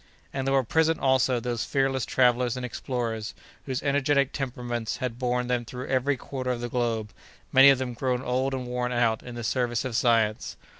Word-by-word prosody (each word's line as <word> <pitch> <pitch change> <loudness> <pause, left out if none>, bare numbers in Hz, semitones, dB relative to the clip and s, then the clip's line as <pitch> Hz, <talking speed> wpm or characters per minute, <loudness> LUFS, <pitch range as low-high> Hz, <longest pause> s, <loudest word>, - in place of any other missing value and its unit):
And 135 -1 -2
there 135 - +2
were 135 - +3
present, 160 +6 +2
also, 130 -2 +2
those 120 -1 -2
fearless 135 -2 0
travellers 125 -1 +2
and 125 - -3
explorers 115 -3 -4 0.3
whose 130 -2 -2
energetic 140 -1 +2
temperaments 120 -4 -3
had 125 -3 -4
borne 125 -1 0
them 125 -1 0
through 125 +2 -7
every 135 +1 +1
quarter 130 0 -5
of 125 -1 -1
the 120 - -3
globe, 115 -3 -1 0.4
many 135 +1 +8
of 135 - +5
them 125 -1 -3
grown 125 +1 -1
old 130 +2 0
and 130 -1 -4
worn 125 0 -2
out 115 -2 +1
in 125 - -9
the 120 - -5
service 120 +1 0
of 125 -3 -3
science. 115 -3 +1
125 Hz, 195 wpm, -26 LUFS, 120-130 Hz, 0.4 s, many